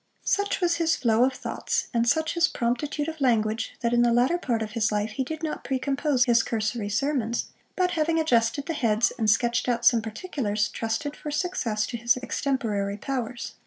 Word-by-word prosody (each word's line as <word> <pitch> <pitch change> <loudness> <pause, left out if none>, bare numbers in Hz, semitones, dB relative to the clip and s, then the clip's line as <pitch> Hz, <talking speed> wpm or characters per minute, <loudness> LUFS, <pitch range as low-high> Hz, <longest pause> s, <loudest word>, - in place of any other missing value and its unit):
Such 405 -1 0
was 345 -1 +2
his 330 -1 +2
flow 230 0 +3
of 265 - 0
thoughts, - - -3
and 235 0 +1
such 315 +4 +1
his 340 0 +3
promptitude 290 +4 -2
of 320 -2 -6
language, 225 -3 +1
that 235 -1 0
in 240 - +4
the 240 0 +4
latter 250 +9 +3
part 235 -8 -1
of 215 - -6
his 220 -2 0
life 210 +1 -1
he 265 +4 -2
did 315 +4 -6
not 310 - -3
precompose 270 0 +1
his 235 -2 +4
cursory 220 -1 -2
sermons; 235 +1 -1 0.2
but 365 -1 +1
having 325 0 +1
adjusted 250 -2 +2
the 330 - -2
heads, 230 -5 +2
and 220 -2 +2
sketched 235 +3 +2
out 235 -1 0
some 230 -1 +5
particulars, 220 - -2
trusted 225 +6 -3
for 300 - -7
success 290 -10 -1
to 235 - -5
his 235 +2 +2
extemporary 230 -6 -2
powers. 245 0 -4
245 Hz, 195 wpm, -26 LUFS, 225-295 Hz, 0.2 s, some